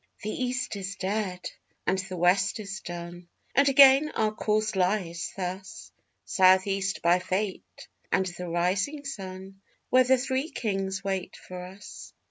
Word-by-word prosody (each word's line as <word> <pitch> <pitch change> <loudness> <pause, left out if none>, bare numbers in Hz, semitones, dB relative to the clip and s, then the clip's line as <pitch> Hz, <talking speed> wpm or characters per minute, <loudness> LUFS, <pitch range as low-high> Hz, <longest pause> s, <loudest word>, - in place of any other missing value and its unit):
The 215 - -2
East 255 -1 -2
is 195 0 -5
dead 190 -2 -2 0.4
and 190 - +1
the 185 -1 -5
West 185 +5 +2
is 195 -2 -6
done, 175 0 -8 0.3
and 275 0 +5
again 275 +2 +7
our 215 -1 +1
course 215 0 0
lies 180 -2 0
thus: 185 +1 -6 0.3
South 185 -2 +5
east 195 0 -2
by 175 +2 +4
Fate 190 +2 -4 0.2
and 190 - +2
the 180 -1 -6
Rising 190 - 0
Sun 195 -5 -7 0.3
where 255 0 +6
the 260 +1 +4
Three 260 +4 -1
Kings 195 - -2
wait 190 -2 -3
for 180 0 -9
us. 190 +3 -11
195 Hz, 145 wpm, -27 LUFS, 185-215 Hz, 0.4 s, again